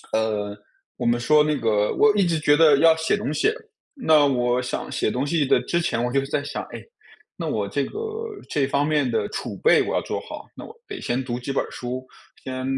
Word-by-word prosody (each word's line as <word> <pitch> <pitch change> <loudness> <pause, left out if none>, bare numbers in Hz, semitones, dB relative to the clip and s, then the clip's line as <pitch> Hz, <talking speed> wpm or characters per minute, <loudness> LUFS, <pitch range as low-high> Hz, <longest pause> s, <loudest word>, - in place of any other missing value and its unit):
呃， 105 -2 -1 0.4
我 - - -4
们 120 0 +2
说 150 +5 +4
那 150 0 +1
个 105 -2 +1
我 215 -1 +4
一 200 - +3
直 165 -3 +1
觉 145 -1 +4
得 150 -3 +6
要 160 +1 +6
写 160 0 0
东 145 - -3
西， 425 - +2 0.4
那 155 - +4
我 125 -1 +1
想 125 - -4
写 - - 0
东 130 +3 -1
西 145 -1 +1
的 125 - +4
之 170 +7 -1
前 120 -7 -1
我 125 - -1
就 140 - +3
是 135 - -3
在 145 0 -1
想， 145 - -5
诶， - - -10 0.5
那 - - -4
我 - - -1
这 - - -1
个 425 - -7 0.5
这 140 -2 0
方 140 +1 +1
面 145 -4 +1
的 115 - 0
储 - - -5
备 475 - +4
我 - - -2
要 - - +1
做 - - -3
好， - - -9
那 - - -9
我 445 - -11
得 410 -3 -7
先 125 +2 -1
读 120 -1 -4
几 125 +2 -5
本 135 - 0
儿 - - -9
书， 125 +1 -5 0.4
先 130 -1 -5
140 Hz, 255 characters per minute, -23 LUFS, 125-155 Hz, 0.5 s, 得